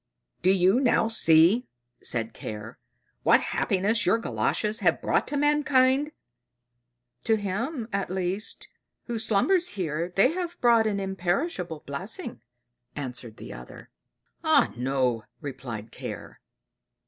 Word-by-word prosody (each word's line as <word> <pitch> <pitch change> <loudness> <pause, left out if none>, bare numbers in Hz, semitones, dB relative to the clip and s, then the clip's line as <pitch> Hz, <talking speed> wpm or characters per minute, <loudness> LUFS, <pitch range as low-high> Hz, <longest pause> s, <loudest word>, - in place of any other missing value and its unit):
"Do 185 - +3
you 190 +4 +4
now 240 -4 +3
see," 180 +3 +4 0.3
said 115 -2 -1
Care, 105 +1 -8 0.4
"what - - +5
happiness 205 +3 +1
your 185 +5 +3
Galoshes 220 -1 -1
have 175 -6 +2
brought - - +1
to 290 - -2
mankind?" 290 -1 +3 1.1
"To 225 - +4
him, 220 - -3
at 200 -1 -1
least, 185 +3 -3 0.4
who 235 -2 -3
slumbers 285 - +2
here, 170 -1 -2
they 195 - +5
have 350 0 -4
brought 235 -2 +4
an 200 -2 -1
imperishable 185 - -2
blessing," 190 - -5 0.5
answered 125 -5 -6
the - - -9
other. - - -12 0.5
"Ah - - +4
no!" 125 -2 0
replied 125 -6 -7
Care. - - -8
195 Hz, 120 wpm, -26 LUFS, 150-235 Hz, 1.1 s, what